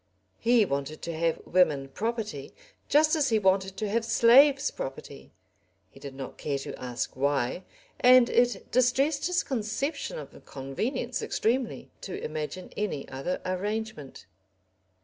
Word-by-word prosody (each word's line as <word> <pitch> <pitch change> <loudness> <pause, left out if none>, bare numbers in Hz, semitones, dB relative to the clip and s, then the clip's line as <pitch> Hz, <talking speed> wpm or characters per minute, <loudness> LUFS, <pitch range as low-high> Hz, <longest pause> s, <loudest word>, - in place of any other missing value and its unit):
He 235 -2 +4
wanted 140 -1 -4
to 170 - -4
have 165 0 0
women 155 -7 +2
property 215 - -4 0.3
just 305 +2 +4
as 290 -3 +1
he 225 - +3
wanted 190 -1 +1
to 210 +1 -2
have 225 +2 0
slaves 270 +5 +5
property, 100 - -8 0.6
he - - -16
did 135 -1 -9
not 135 -1 -8
care 145 -2 -2
to 135 - -6
ask 125 -1 -4
why, 140 +5 0 0.3
and 250 -1 +7
it 245 0 +1
distressed 270 +5 +2
his 360 0 +1
conception 265 - -3
of - - -10
convenience 230 - -3
extremely 240 +2 -1
to 190 - -6
imagine 155 +4 -5
any 200 -10 -3
other 135 +8 -3
arrangement. 200 -4 -4
205 Hz, 135 wpm, -28 LUFS, 145-245 Hz, 0.6 s, and